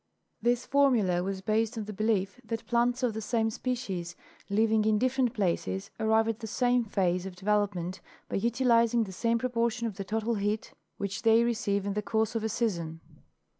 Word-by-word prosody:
This 240 +1 +1
formula 240 -11 +3
was 190 +1 -3
based 220 +3 0
on 215 - -3
the 210 - -6
belief 215 +1 0
that 225 0 -4
plants 245 +2 +1
of 240 -3 +1
the 220 - -4
same 225 0 0
species 195 -9 -3 0.3
living 220 +1 +3
in 215 0 +3
different 255 +1 +1
places 170 - -1
arrive 220 0 +3
at 225 0 -2
the 225 - -6
same 245 +2 +2
phase 185 -4 0
of 185 - -8
development 190 -2 -1 0.3
by - - -2
utilizing 235 +1 +3
the 195 - -7
same 230 +5 +1
proportion 235 -1 -1
of 215 -4 -4
the 200 - -3
total 220 +3 -1
heat 210 0 -2 0.2
which 200 -1 -3
they 225 0 +5
receive 215 -4 0
in 200 - -1
the 210 - -1
course 220 0 0
of 225 -2 -2
a 220 - 0
season. 170 -9 -2
220 Hz, 185 wpm, -29 LUFS, 200-235 Hz, 0.3 s, they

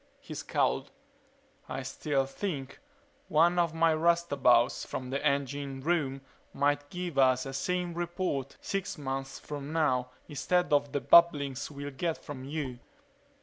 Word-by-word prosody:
He - - -9
scowled. - - 0 0.8
"I 135 - -4
still 135 +1 -1
think 140 -2 -5 0.5
one 170 +1 +4
of 165 -2 +1
my 165 0 +4
roustabouts 155 -7 +3
from 130 0 -5
the 140 - -2
engine 140 -1 -1
room 140 -4 0 0.3
might 145 +1 +1
give 175 -4 -3
us 130 -1 +4
a 135 - -5
sane 175 +5 -1
report 170 -5 -3
six 195 0 -3
months 135 -1 -4
from 145 0 -7
now 130 -6 +1 0.2
instead 175 +3 0
of 145 -1 +3
the 145 - -1
babblings 145 -5 +5
we'll 145 -1 -6
get 165 +4 -2
from 135 -3 -8
you." 140 -4 -4
145 Hz, 140 wpm, -30 LUFS, 135-170 Hz, 0.8 s, babblings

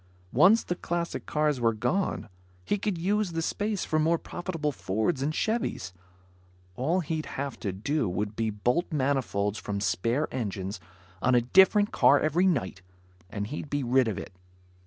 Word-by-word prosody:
Once 190 - +6
the - - -2
classic 170 -1 -3
cars 150 -4 +1
were 115 -1 +2
gone, 185 - -1 0.4
he 205 - 0
could 200 -3 -1
use 195 +1 0
the 165 - -1
space 205 +2 -1
for 155 - +1
more 165 +2 +3
profitable 165 -3 -3
Fords 115 - -1
and 145 +3 0
Chevys. 185 - -2 0.8
All 160 - +1
he'd 160 -1 -3
have 140 0 -4
to 100 - -2
do 110 +5 -1
would 105 +4 -3
be 115 0 0
bolt 125 - 0
manifolds 130 -8 0
from 100 -1 -3
spare 115 +9 0
engines 100 -6 -3 0.4
on 130 - +3
a 120 - +5
different 190 - +5
car 145 - +5
every 165 +5 +2
night, 115 - -1 0.5
and 100 +1 -3
he'd 145 +5 -6
be 145 -1 -1
rid 125 0 +3
of 110 - -2
it. - - -7
145 Hz, 165 wpm, -28 LUFS, 110-170 Hz, 0.8 s, Once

